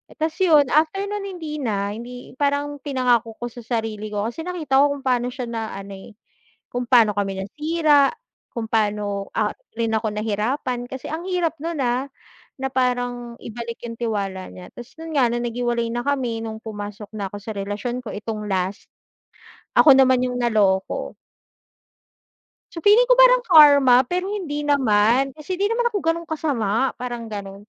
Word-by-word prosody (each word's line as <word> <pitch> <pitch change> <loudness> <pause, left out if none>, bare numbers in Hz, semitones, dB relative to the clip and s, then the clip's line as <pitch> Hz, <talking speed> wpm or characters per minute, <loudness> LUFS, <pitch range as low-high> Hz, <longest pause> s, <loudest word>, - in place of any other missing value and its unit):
Tapos 315 0 -2
yun 305 -8 +4
after 315 +6 +2
no'n 410 0 -4
hindi 305 -3 -6
na 205 -6 -1
hindi 245 +3 -9
parang 285 0 0
pinangako 250 -5 0
ko 240 0 -5
sa 240 - -11
sarili 220 -2 -3
ko 210 -1 -3
kasi 240 +7 -7
nakita 310 -7 +1
ko 285 0 +2
kung 275 - -11
paano 245 -2 +1
siya 250 0 -5
na 225 -1 -3
ano, 200 0 -8
eh, 205 - -14 0.6
kung 245 - 0
pa'no 225 -5 +5
kami 195 -1 -2
nasira, 300 - +2 0.4
kung 230 -2 -4
pa'no, 205 -2 -1
ah, 210 -1 -1 0.2
rin 225 -1 +1
ako 220 -1 -1
nahirapan 225 +5 -2
kasi 265 -1 -6
ang 320 +2 -4
hirap 355 -3 -1
nun, 335 -2 -3
ah, 250 0 +1 0.6
na 265 - -1
parang 245 -2 -2
ibalik 235 0 -7
yung 230 -1 -6
tiwala 200 -5 -3
niya 180 - -12
tapos 240 +2 -12
'yon 325 0 -8
nga 260 -4 +4
na 240 +1 -2
naghiwalay 240 -1 -1
na 240 +1 -2
kami 255 -5 0
nung 220 -1 -6
pumasok 205 -1 -7
na 200 -2 -3
ko 190 - -10
sa 210 +2 -7
relasyon 205 +5 -3
ko 220 - -6
itong 210 0 -5
last. 190 +1 -2 0.9
Ako 295 - +8
naman 260 -1 +5
yung 250 0 -3
naloko. 205 -5 +1 1.6
So, 335 - -6
feeling 415 +8 +6
ko - - +3
parang - - +6
karma, 285 - +7
pero 360 +1 -1
hindi 295 -8 -3
naman. 260 -1 +2
Kasi 355 +5 -5
'di 405 - +3
naman 475 +1 0
ako 405 - -1
gano'n 330 0 -1
kasama 265 -7 -1
parang 240 -2 -5
gano'n. 200 -2 -7
245 Hz, 170 wpm, -22 LUFS, 215-290 Hz, 1.6 s, Ako